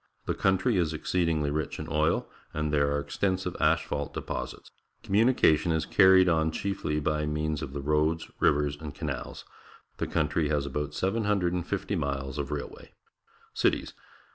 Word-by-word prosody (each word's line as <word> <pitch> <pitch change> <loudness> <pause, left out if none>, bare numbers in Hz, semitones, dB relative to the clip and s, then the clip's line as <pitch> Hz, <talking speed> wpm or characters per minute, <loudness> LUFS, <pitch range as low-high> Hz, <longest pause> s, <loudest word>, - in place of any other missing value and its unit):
The - - 0
country 95 +3 +2
is 80 -3 +1
exceedingly 80 -2 0
rich 75 0 -2
in - - -6
oil, 75 +1 +1 0.3
and 75 -1 -1
there 70 -1 +3
are 70 - +1
extensive 95 +3 -2
asphalt 75 -2 0
deposits. - - -5 0.3
Communication 100 -7 +3
is 80 0 0
carried 95 -1 +6
on 80 -2 +2
chiefly 80 -4 -2
by 75 0 -1
means 75 0 -1
of - - -5
the 70 - -4
roads, 75 +3 +1
rivers, 75 0 +2
and 75 -1 -8
canals. 70 -3 -5 0.5
The - - -2
country 75 -1 0
has 75 -2 0
about 75 +1 -3
750 95 -4 0
miles 70 0 -3
of 70 - -3
railway. 75 -1 -6 0.6
Cities. - - 0
75 Hz, 145 wpm, -28 LUFS, 75-90 Hz, 0.6 s, carried